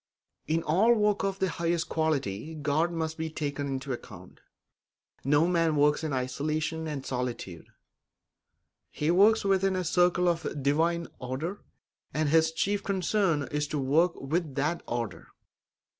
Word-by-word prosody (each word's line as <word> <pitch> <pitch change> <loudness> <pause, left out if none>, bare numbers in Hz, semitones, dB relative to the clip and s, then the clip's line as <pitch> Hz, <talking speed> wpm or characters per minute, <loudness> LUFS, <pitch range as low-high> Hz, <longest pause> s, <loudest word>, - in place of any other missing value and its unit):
In 160 +2 0
all 205 +10 +4
work 210 -2 +1
of 195 -1 -1
the 190 - +1
highest 170 -1 -1
quality 155 -4 -1
God 155 +3 0
must 160 -1 -3
be 160 0 -2
taken 145 -2 -3
into 135 0 -3
account. 120 - -10 0.8
No 145 +4 +4
man 165 -3 +2
works 150 +2 +3
in 155 - -2
isolation 155 +5 -2
and 145 -3 -5
solitude; 125 -9 -4 1.2
he 150 +2 0
works 200 +4 +5
within 195 0 +2
the 185 -1 -1
circle 180 +1 +3
of 170 -2 +1
a - - -4
divine 160 +4 +1
order, 140 +10 -4 0.5
and 155 -1 +1
his 160 +1 +4
chief 200 +5 0
concern 190 -5 +1
is 150 0 -1
to 150 - -3
work 155 +6 +2
with 150 0 -2
that 150 +4 0
order. 115 -5 -4
160 Hz, 145 wpm, -28 LUFS, 145-175 Hz, 1.2 s, works